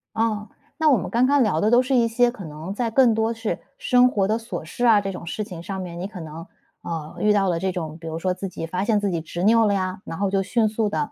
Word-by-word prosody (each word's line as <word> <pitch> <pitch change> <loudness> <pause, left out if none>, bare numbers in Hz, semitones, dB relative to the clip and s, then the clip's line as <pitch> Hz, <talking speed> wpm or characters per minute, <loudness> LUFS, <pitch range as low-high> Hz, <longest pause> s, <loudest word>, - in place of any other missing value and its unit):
哦， 220 -2 0 0.3
那 315 -1 +3
我 260 - +5
们 - - -4
刚 240 +2 +3
刚 280 -1 +4
聊 185 -7 +1
的 215 - +2
都 240 +1 +6
是 260 +1 -2
一 235 -2 +4
些 240 +1 +2
可 200 -8 -9
能 155 +5 -7
在 235 +1 -1
更 240 -1 +4
多 225 +1 0
是， 225 -1 -3 0.2
生 250 0 +4
活 200 -5 +1
的 220 +2 +1
琐 230 -7 -6
事 240 +9 -3
啊， 215 -3 +6
这 195 0 -3
种 175 -2 -8
事 215 - -3
情 180 -4 -8
上 190 +1 -5
面， 175 -1 -7
你 190 - -3
可 185 -5 -9
能， 160 +2 -9 0.4
呃， 160 -2 -5
遇 210 0 +3
到 195 -2 +2
了 165 -1 0
这 190 0 -1
种， 160 -3 -5
比 165 - -9
如 160 0 -4
说 185 +2 0
自 195 +1 -5
己 165 - -6
发 180 +4 -2
现 220 -2 +2
自 200 - 0
己 170 - -1
执 170 +3 -5
拗 225 +1 +5
了 205 - +2
呀， 185 -1 -2
然 165 - -6
后 195 -1 0
就 195 -1 +2
迅 220 +2 +1
速 220 0 0
地， 285 +8 -2
205 Hz, 315 characters per minute, -23 LUFS, 180-230 Hz, 0.4 s, 都